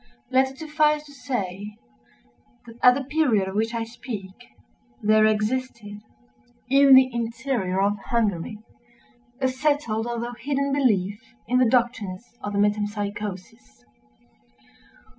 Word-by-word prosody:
Let 265 Hz, +1 st, +3 dB
it 265 Hz, -, -14 dB
suffice 300 Hz, 0 st, +1 dB
to 290 Hz, -, -14 dB
say, 210 Hz, -6 st, -5 dB, 0.9 s
that 230 Hz, 0 st, -14 dB
at 250 Hz, 0 st, +7 dB
the 275 Hz, -, -3 dB
period 260 Hz, -9 st, +1 dB
of 190 Hz, -, -5 dB
which 225 Hz, +3 st, -1 dB
I 230 Hz, -, -1 dB
speak, 225 Hz, -4 st, -7 dB, 0.7 s
there 215 Hz, +1 st, +5 dB
existed, 215 Hz, -1 st, -2 dB, 0.7 s
in 275 Hz, +1 st, +7 dB
the 260 Hz, 0 st, +7 dB
interior 230 Hz, -4 st, -2 dB
of 200 Hz, +1 st, +1 dB
Hungary, 210 Hz, -3 st, -1 dB, 0.8 s
a 260 Hz, -, +2 dB
settled 260 Hz, -4 st, 0 dB
although 240 Hz, 0 st, -4 dB
hidden 280 Hz, +2 st, -2 dB
belief 210 Hz, -7 st, +1 dB, 0.3 s
in 250 Hz, +2 st, +2 dB
the 250 Hz, -3 st, +4 dB
doctrines 230 Hz, -5 st, -1 dB
of 205 Hz, -, -5 dB
the -, -, -1 dB
Metempsychosis. 205 Hz, -, -3 dB
230 Hz, 125 wpm, -24 LUFS, 205-260 Hz, 0.9 s, at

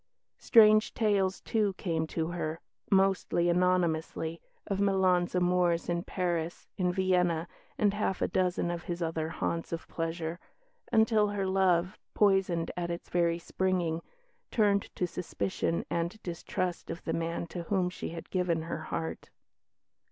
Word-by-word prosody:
Strange 215 Hz, -2 st, +6 dB
tales, 200 Hz, -4 st, +1 dB
too, 210 Hz, -3 st, +1 dB
came 165 Hz, -4 st, -2 dB
to 160 Hz, 0 st, -2 dB
her 165 Hz, -2 st, -3 dB, 0.3 s
(mostly 190 Hz, -3 st, +3 dB
anonymously) 170 Hz, -2 st, +1 dB, 0.2 s
of 195 Hz, 0 st, -1 dB
Milan's 185 Hz, -3 st, +2 dB
amours 180 Hz, -1 st, +2 dB
in 170 Hz, 0 st, 0 dB
Paris, 175 Hz, -3 st, -2 dB
in 180 Hz, -1 st, +1 dB
Vienna, 180 Hz, -3 st, +1 dB, 0.3 s
and 205 Hz, -2 st, +3 dB
half 205 Hz, -2 st, -1 dB
a -, -, +1 dB
dozen 180 Hz, -1 st, 0 dB
of 175 Hz, 0 st, -5 dB
his 175 Hz, -2 st, -3 dB
other 160 Hz, -1 st, -2 dB
haunts 165 Hz, 0 st, -3 dB
of 165 Hz, -1 st, -4 dB
pleasure, 165 Hz, 0 st, -3 dB, 0.5 s
until 220 Hz, -2 st, +4 dB
her 205 Hz, -1 st, -2 dB
love, 190 Hz, -1 st, +2 dB, 0.2 s
poisoned 190 Hz, -5 st, +2 dB
at 175 Hz, -1 st, -2 dB
its 170 Hz, 0 st, -5 dB
very 170 Hz, -1 st, +2 dB
springing, 175 Hz, -2 st, -1 dB, 0.5 s
turned 205 Hz, -3 st, +2 dB
to 180 Hz, -, 0 dB
suspicion 175 Hz, 0 st, -2 dB
and 170 Hz, +5 st, -2 dB
distrust 175 Hz, +1 st, -3 dB
of 165 Hz, +1 st, -6 dB
the 165 Hz, -, -2 dB
man 165 Hz, +1 st, -2 dB
to 170 Hz, +1 st, -6 dB
whom 185 Hz, 0 st, +1 dB
she 180 Hz, -, -5 dB
had 165 Hz, 0 st, -8 dB
given 175 Hz, -3 st, 0 dB
her 165 Hz, -1 st, -4 dB
heart. 160 Hz, +1 st, -4 dB
180 Hz, 145 wpm, -30 LUFS, 170-190 Hz, 0.5 s, Strange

